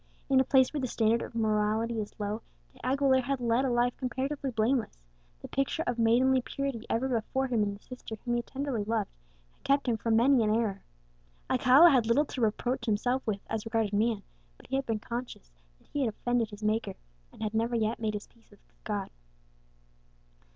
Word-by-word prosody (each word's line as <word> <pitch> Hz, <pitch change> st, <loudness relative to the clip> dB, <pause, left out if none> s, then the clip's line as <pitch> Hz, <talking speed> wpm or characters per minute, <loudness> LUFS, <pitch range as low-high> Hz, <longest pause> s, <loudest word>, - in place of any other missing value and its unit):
In 265 Hz, -, +6 dB
a -, -, +5 dB
place 260 Hz, +1 st, +3 dB
where 295 Hz, -, -2 dB
the 255 Hz, -, -1 dB
standard 230 Hz, 0 st, +2 dB
of -, -, -7 dB
morality 220 Hz, +1 st, +1 dB
is 210 Hz, -, -9 dB
low, 210 Hz, +2 st, -3 dB, 0.3 s
De -, -, -20 dB
Aguilera 265 Hz, +1 st, +3 dB
had 270 Hz, +1 st, -2 dB
led 240 Hz, +1 st, +2 dB
a -, -, +1 dB
life 240 Hz, 0 st, +1 dB
comparatively 265 Hz, +2 st, -2 dB
blameless; 235 Hz, -, 0 dB, 0.5 s
the -, -, -5 dB
picture 275 Hz, +4 st, -1 dB
of 245 Hz, -1 st, -2 dB
maidenly 255 Hz, +3 st, +4 dB
purity 270 Hz, -3 st, -4 dB
ever 245 Hz, +4 st, 0 dB
before 260 Hz, +2 st, -1 dB
him 240 Hz, -4 st, 0 dB
in 200 Hz, -1 st, 0 dB
the -, -, -14 dB
sister 250 Hz, -3 st, -8 dB
whom 240 Hz, -, 0 dB
he 240 Hz, -, +1 dB
tenderly 265 Hz, -3 st, -3 dB
loved, 215 Hz, -1 st, -1 dB, 0.4 s
had -, -, -34 dB
kept 275 Hz, 0 st, +2 dB
him 235 Hz, -2 st, +2 dB
from 225 Hz, +1 st, +1 dB
many 245 Hz, +1 st, +5 dB
an 215 Hz, -, +1 dB
error. 210 Hz, -4 st, -1 dB, 0.7 s
Alcala 260 Hz, +6 st, +7 dB
had 245 Hz, -5 st, +3 dB
little 265 Hz, +6 st, +3 dB
to 260 Hz, -, -6 dB
reproach 235 Hz, +2 st, 0 dB
himself 245 Hz, +5 st, +1 dB
with 200 Hz, -2 st, -1 dB
as 220 Hz, -1 st, -3 dB
regarded 225 Hz, -2 st, -1 dB
man, 215 Hz, 0 st, +1 dB, 0.3 s
but -, -, -18 dB
he -, -, -3 dB
had 270 Hz, 0 st, -1 dB
become 225 Hz, -1 st, 0 dB
conscious 235 Hz, -, -6 dB, 0.3 s
that -, -, -28 dB
he 290 Hz, -, -1 dB
had 240 Hz, -, +1 dB
offended 235 Hz, +1 st, -1 dB
his 205 Hz, 0 st, -10 dB
Maker, 215 Hz, -2 st, 0 dB, 0.4 s
and -, -, -9 dB
had 215 Hz, 0 st, -2 dB
never 230 Hz, +2 st, 0 dB
yet 225 Hz, 0 st, 0 dB
made 215 Hz, -2 st, -1 dB
his 205 Hz, -, -5 dB
peace 230 Hz, -1 st, -28 dB
with 205 Hz, -, -20 dB
his -, -, -35 dB
God. 205 Hz, -3 st, -3 dB
235 Hz, 205 wpm, -29 LUFS, 220-260 Hz, 0.7 s, Alcala